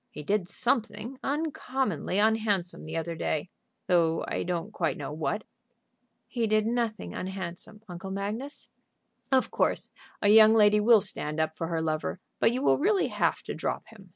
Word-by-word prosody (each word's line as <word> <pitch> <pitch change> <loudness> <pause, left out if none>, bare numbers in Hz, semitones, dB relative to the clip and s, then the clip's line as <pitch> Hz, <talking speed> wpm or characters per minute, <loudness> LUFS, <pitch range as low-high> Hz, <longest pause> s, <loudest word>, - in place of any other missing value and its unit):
He 150 - -9
did 200 +2 0
something 240 0 -1
uncommonly 270 - -2
unhandsome 210 -5 +1
the 160 +1 -4
other 165 +1 -3
day, 160 +1 -2 0.3
though 165 -2 +2
I - - -2
don't 180 +4 -3
quite 165 -5 -1
know 145 -1 -5
what." 160 +7 -2 0.8
"He 235 -3 -1
did 215 0 +2
nothing 230 -2 -2
unhandsome, 190 +3 -6
Uncle 185 +1 -7
Magnus." 210 +9 -5 0.6
"Of 260 -1 +2
course - - 0 0.3
a 205 - +2
young 220 +1 +8
lady 210 -1 +5
will 220 0 +6
stand 150 -3 +3
up 160 0 0
for 165 - -3
her 165 -1 -2
lover, 155 +2 -2 0.2
but - - +4
you 255 +3 -2
will - - +3
really 390 +5 +2
have - - 0
to - - -5
drop - - -4
him. 200 -4 -16
205 Hz, 165 wpm, -28 LUFS, 170-225 Hz, 0.8 s, young